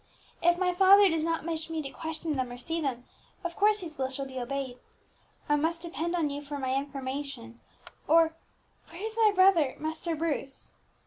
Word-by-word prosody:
"If 345 0 +4
my 360 -1 +1
father 390 +2 +7
does 325 -2 0
not 330 0 -1
wish 325 -1 -3
me 325 -1 -2
to 275 - -6
question 320 0 -4
them 255 -3 -2
or 245 - -7
see 325 +7 -3
them, 255 -5 -2 0.4
of 345 -1 -4
course 420 0 +3
his 320 -5 -8
will 260 -1 0
shall 270 +1 -4
be 260 -1 -6
obeyed. 255 0 -4 0.7
I 295 - +3
must 330 +3 -1
depend 340 +1 -3
on 315 -4 0
you 285 +1 -4
for 290 0 -6
my 260 -1 -1
information, 270 -3 -4 0.5
or 325 0 +5 0.6
where 335 - -10
is 445 0 -4
my 445 -2 +5
brother, 370 -7 +4
Master 320 +2 -3
Bruce?" 295 -4 -3
315 Hz, 190 wpm, -29 LUFS, 275-340 Hz, 0.7 s, father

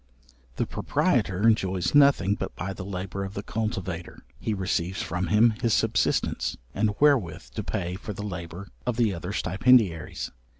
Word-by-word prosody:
The - - 0
proprietor 95 +5 +1
enjoys 95 -5 +1
nothing 140 -9 +5
but - - -5
by 95 +3 -4
the 95 - -7
labour 95 0 -4
of 95 0 -6
the 100 - -4
cultivator. 95 -7 -4 0.2
He - - -2
receives 95 -1 -1
from 85 +2 -2
him 110 +4 +5
his 115 -2 +3
subsistence, - - +1 0.2
and 105 0 0
wherewith 100 - +2
to - - -4
pay 85 +1 -3
for 105 - -7
the 105 +1 -6
labour 90 0 -6 0.2
of 120 -2 0
the 115 -5 +2
other 90 +2 -5
stipendiaries. 95 - +2
100 Hz, 160 wpm, -26 LUFS, 90-110 Hz, 0.2 s, nothing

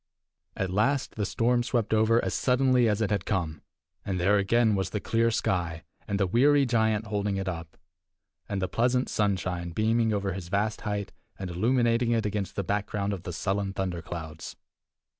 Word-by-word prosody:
At 95 -1 -1
last 115 +8 +1
the 105 -3 -2
storm 120 +1 +2
swept 120 -3 -1
over 110 +2 +3
as - - -1
suddenly 125 -2 +3
as 105 +1 0
it 105 - 0
had 100 -3 0
come. 85 -7 -2 0.4
And 95 -2 -2
there 100 +4 +3
again 110 +3 +3
was 95 -2 0
the 105 - -2
clear 115 +3 +1
sky, 85 -7 -1 0.2
and 100 -1 -1
the 100 - +3
weary 140 +8 +4
giant 110 -3 +1
holding 105 -1 -1
it 95 0 -3
up, 85 -3 -5 0.7
and 95 -2 -2
the - - +1
pleasant 125 +4 +1
sunshine 90 -4 -1
beaming 110 +5 +1
over 100 -2 -1
his 90 -2 -6
vast 105 +4 -1
height 105 -2 -3 0.3
and 95 -2 -5
illuminating 115 +4 +2
it 115 -2 0
against 105 -2 -2
the 100 - -1
background 100 +1 -1
of 95 - -5
the 90 - -6
sullen 95 +3 -2
thunder 90 -3 -3
clouds. 80 -1 -7
105 Hz, 180 wpm, -27 LUFS, 95-115 Hz, 0.7 s, weary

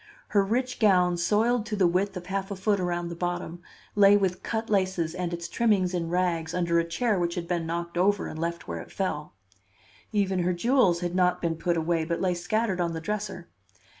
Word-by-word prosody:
Her 200 -2 +3
rich 250 +5 -1
gown, 180 -5 +4
soiled 215 +6 +1
to 215 - -2
the 195 -3 +3
width 185 +3 +1
of 175 - -7
half 195 +1 -3
a 200 - -4
foot 200 +1 +1
around 175 -1 -2
the 170 - -6
bottom, 175 0 -3 0.3
lay 205 0 +6
with 190 -2 -1
cut 225 0 -3
laces 185 -5 0
and 180 -1 -3
its 170 0 -4
trimmings 200 -6 +1
in 170 -2 -2
rags 170 -2 0
under 170 -1 +2
a - - +2
chair 200 +5 0
which 170 -1 -1
had 170 -2 -4
been 170 -2 -1
knocked 170 +1 -3
over 200 +2 +2
and 155 - -6
left 170 +1 -3
where 85 -1 -4
it - - -13
fell. 150 - -3 0.8
Even 195 -3 +1
her 180 +1 +1
jewels 190 -3 +3
had 175 -1 -2
not 180 -1 +2
been 165 -1 -1
put 170 +1 0
away, 165 0 0
but 170 +1 -2
lay 185 -1 +1
scattered 190 +2 -1
on 170 -1 -1
the 165 - -3
dresser. 195 -1 -4
180 Hz, 215 wpm, -27 LUFS, 170-200 Hz, 0.8 s, lay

